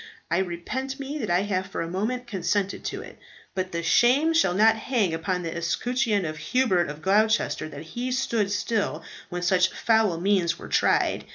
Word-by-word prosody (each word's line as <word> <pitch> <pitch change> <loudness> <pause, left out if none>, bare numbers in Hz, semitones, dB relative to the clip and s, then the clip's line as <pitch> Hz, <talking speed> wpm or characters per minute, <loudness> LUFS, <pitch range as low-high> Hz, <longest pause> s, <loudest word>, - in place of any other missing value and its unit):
I 170 - +3
repent 225 +10 -4
me 280 +2 -4
that 215 - -3
I 175 +1 +3
have 190 -2 -1
for 185 - -4
a - - -5
moment 220 +8 -2
consented 195 -2 -1
to - - -4
it. - - -13 0.3
But 185 -1 -3
the 170 0 -3
shame 260 - +4
shall 195 - +3
not 220 +3 +5
hang 220 -6 0
upon 180 +2 -2
the 165 - -4
escutcheon 210 +4 0
of 155 -1 -4
Hubert 185 - +1
of 150 +1 -8
Gloucester 215 -3 +2
that 145 0 -8
he 240 +10 -4
stood 235 -6 0
still 205 -6 -1 0.3
when 175 0 -4
such 180 +1 +3
foul 220 -7 +2
means 180 -2 +1
were - - -10
tried. - - +2
195 Hz, 185 wpm, -25 LUFS, 175-235 Hz, 0.3 s, not